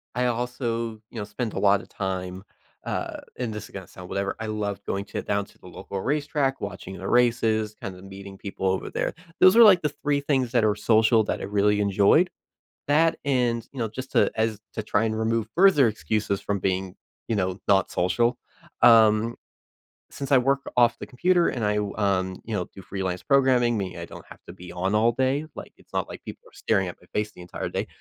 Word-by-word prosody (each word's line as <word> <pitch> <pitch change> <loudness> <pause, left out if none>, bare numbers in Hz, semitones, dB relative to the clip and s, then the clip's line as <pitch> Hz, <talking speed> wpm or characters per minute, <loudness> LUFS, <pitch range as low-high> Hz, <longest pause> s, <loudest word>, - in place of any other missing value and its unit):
I 125 0 +1
also, 120 -1 -2 0.2
you - - -10
know, - - -3
spent 110 +2 -4
a - - -3
lotta 100 -1 +3
time, 95 -1 -4 0.4
uh - - -3 0.2
and 120 -3 -3
this 105 0 -6
is - - -15
gonna 95 -3 -8
sound 90 -1 -11
whatever, 100 0 -2
I 110 - -4
loved 105 -2 -3
going 100 +1 -3
to - - -5
down 100 0 -1
to - - -22
the - - -14
local 100 -1 -6
racetrack, 145 +1 -1
watching 95 -1 -6
the 95 - -6
races, 115 -3 +2
kind 95 - -6
of 90 - -13
meeting 95 0 -10
people 95 -1 -4
over 95 0 -1
there. - - -2 0.3
Those 185 +3 +7
are 235 - +9
like 190 -5 +7
the 150 - 0
3 145 -1 +1
things 135 -4 0
that 120 -3 +2
are 105 -1 +3
social 110 +1 +4
that - - -2
I - - -5
really 105 +1 +2
enjoyed. 100 - +4 0.6
That 160 +3 +3
and, 120 -4 0
you 135 - -9
know, 115 - 0
just 130 +5 -8
to - - +3
as 110 -1 0
to 110 - -3
try 105 0 +1
and 110 -1 -1
remove 110 0 0
further 175 -8 +6
excuses 105 -2 -1
from 100 0 -2
being, 95 0 -2 0.3
you 115 - 0
know, 95 -1 -1
not 95 -2 +3
social, 115 +8 +1 0.4
um, 115 0 +6 0.8
since 140 0 -6
I 135 - +7
work 135 +2 +1
off 120 -1 +4
the - - -6
computer 175 +6 +2
and 120 - -3
I 105 0 +1
w 105 -1 -2
um, 95 -3 0
you 110 - -3
know, 90 -3 -1
do 95 - -10
freelance 95 -1 -4
programming, 130 -4 +3
meaning 95 -3 -4
I - - -5
don't - - -12
have - - -13
to - - -9
be 90 -1 -11
on 95 +3 -1
all 115 +2 +4
day, 130 +5 0
like, - - -9
it's - - -24
not - - -1
like - - -9
people - - -9
are - - -31
staring 95 -4 0
at 90 - -7
my 90 - -22
face 105 0 -1
the 90 - -13
entire 90 - -5
day. - - -3
110 Hz, 220 wpm, -25 LUFS, 100-125 Hz, 0.8 s, are